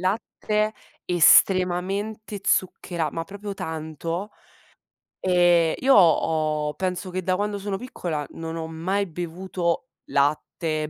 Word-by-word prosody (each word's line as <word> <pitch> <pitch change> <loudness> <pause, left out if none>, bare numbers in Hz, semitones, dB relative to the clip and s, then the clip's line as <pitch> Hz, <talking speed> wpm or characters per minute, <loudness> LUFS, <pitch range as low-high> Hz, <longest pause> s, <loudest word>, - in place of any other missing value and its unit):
latte, 210 +2 -1 0.3
estremamente 190 +4 +3
zucchera 175 -5 0
ma 165 - -3
proprio 200 +2 -7
tanto. 160 +4 -4 0.9
Ehm, 175 -3 +4
io 270 +1 +4
ho 155 -4 +3
penso, 185 0 -3
che 185 0 -3
da 185 0 +1
quando 205 0 -1
sono 195 -1 -3
piccola, 175 - -4
non 165 0 -6
ho 160 0 -4
mai 185 +5 -1
bevuto 175 +4 -3 0.2
latte, 155 +2 0
180 Hz, 110 wpm, -24 LUFS, 160-195 Hz, 0.9 s, Ehm